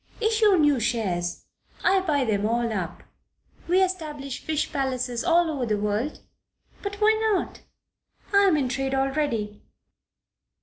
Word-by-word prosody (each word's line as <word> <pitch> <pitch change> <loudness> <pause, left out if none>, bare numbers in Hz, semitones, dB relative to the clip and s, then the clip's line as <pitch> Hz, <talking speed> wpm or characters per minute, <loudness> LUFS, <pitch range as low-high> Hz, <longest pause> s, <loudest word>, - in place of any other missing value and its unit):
Issue 435 -3 +3
new 295 -4 +3
shares. 190 -7 -2 0.4
I 385 - +4
buy 300 -8 0
them 205 -3 0
all 235 0 0
up. 180 -4 -4 0.6
We 370 +2 +4
establish 300 -8 -4
fish 310 -1 -1
palaces 255 -3 -1
all 345 0 +3
over 265 -5 -2
the 210 -1 +1
world? 210 +7 -2 0.6
But 405 0 -4
why 430 +1 +4 0.2
not? 390 - -2 0.7
I 400 0 +6
am 335 -5 +4
in 275 -3 0
trade 270 +2 -2
already. 270 -7 -1
275 Hz, 135 wpm, -25 LUFS, 230-345 Hz, 0.7 s, I